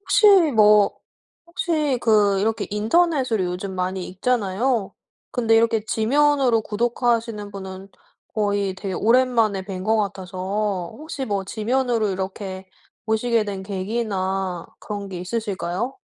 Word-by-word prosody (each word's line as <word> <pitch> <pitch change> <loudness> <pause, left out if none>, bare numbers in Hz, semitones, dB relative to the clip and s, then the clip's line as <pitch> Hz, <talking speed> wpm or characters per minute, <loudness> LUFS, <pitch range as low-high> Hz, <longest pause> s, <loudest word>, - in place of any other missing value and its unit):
혹시 420 +1 +3 0.3
뭐 210 -2 +5 0.5
혹시 310 -6 0
그 205 -4 +3
이렇게 220 +2 0
인터넷으로 250 - +2
요즘 180 +2 -4
많이 185 0 -2
읽잖아요. 220 +2 0 0.4
근데 225 -2 +2
이렇게 225 -1 +3
지면으로 265 +1 +3
구독하시는 230 -1 -1
분은 190 -1 -8 0.5
거의 200 -2 0
되게 190 0 -5
오랜만에 230 -3 +2
뵌 185 -1 -6
것 220 +1 +2
같아서 190 -1 -2
혹시 305 -3 -5
뭐 200 -4 -2
지면으로 230 +2 0
이렇게 190 0 -5 0.4
보시게 220 0 +1
된 195 -2 -5
계기나 190 -3 -2
그런 205 -2 -6
게 185 -2 -6
있으실까요? 205 - -3
210 Hz, 285 characters per minute, -22 LUFS, 190-235 Hz, 0.5 s, 뭐